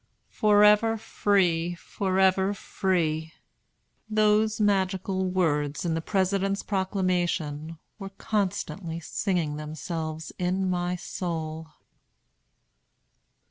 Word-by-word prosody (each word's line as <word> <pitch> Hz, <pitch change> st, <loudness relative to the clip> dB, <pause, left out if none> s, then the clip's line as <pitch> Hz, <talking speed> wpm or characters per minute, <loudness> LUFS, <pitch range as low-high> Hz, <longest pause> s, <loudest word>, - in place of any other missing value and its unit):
"Forever 210 Hz, +1 st, +5 dB
free! 175 Hz, -5 st, +1 dB
forever 190 Hz, +2 st, +1 dB
free!" 160 Hz, -6 st, -1 dB, 0.8 s
those 215 Hz, 0 st, +3 dB
magical 190 Hz, -2 st, +1 dB
words 150 Hz, -5 st, 0 dB
in 165 Hz, -, 0 dB
the 165 Hz, -, -1 dB
President's 195 Hz, +2 st, 0 dB
Proclamation 175 Hz, -5 st, -1 dB, 0.2 s
were 195 Hz, -1 st, -6 dB
constantly 195 Hz, -4 st, -2 dB
singing 170 Hz, -3 st, -1 dB
themselves 155 Hz, +1 st, -5 dB
in 185 Hz, +1 st, 0 dB
my 180 Hz, 0 st, -1 dB
soul. 160 Hz, -3 st, -4 dB
185 Hz, 80 wpm, -27 LUFS, 165-195 Hz, 0.8 s, Forever